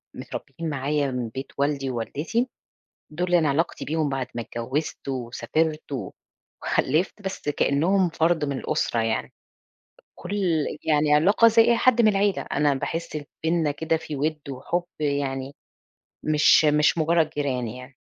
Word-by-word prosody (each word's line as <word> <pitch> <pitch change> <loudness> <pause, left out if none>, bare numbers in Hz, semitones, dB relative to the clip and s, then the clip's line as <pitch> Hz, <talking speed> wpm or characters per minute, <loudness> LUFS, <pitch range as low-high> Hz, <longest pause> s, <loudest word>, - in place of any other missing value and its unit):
متربيين 165 -1 -6
معايا 145 0 -1
من 125 -2 -3
بيت 135 +5 -7
والدي 140 -1 0
ووالدتي، 150 - -2 0.6
دُول 175 +3 0
أنا 160 -4 +3
علاقتي 155 +5 -1
بيهم 155 -1 0
بعد 135 -2 -2
ما 120 - -2
اتجوزت، 130 +8 -4
وسافرت، 145 +5 -2 0.7
وخلفت، 165 +9 0
بس 190 -6 -4
كأنهم 170 +7 +2
فرد 165 -1 +1
من 140 -2 -2
الأسرة 120 - -1
يعني. 110 0 -2 0.8
كل 200 +4 -5 0.5
يعني 150 -1 +3
علاقة 200 +9 +5
زي 225 0 +5
أي 235 0 +4
حد 240 -1 +4
من 220 - +6
العيلة، 200 -1 +1
أنا 145 0 +1
باحس 160 +3 -3 0.3
بيننا 160 -2 +2
كده 160 +3 0
في 155 -2 -6
وِد 155 +2 -1
وحُب 170 +7 -2 0.2
يعني، 140 -2 -2 0.7
مش 155 +1 +5
مش 150 +2 +3
مجرد 160 0 +2
جيران 135 -5 -2
يعني. 125 +4 -9
150 Hz, 140 wpm, -25 LUFS, 135-165 Hz, 0.8 s, من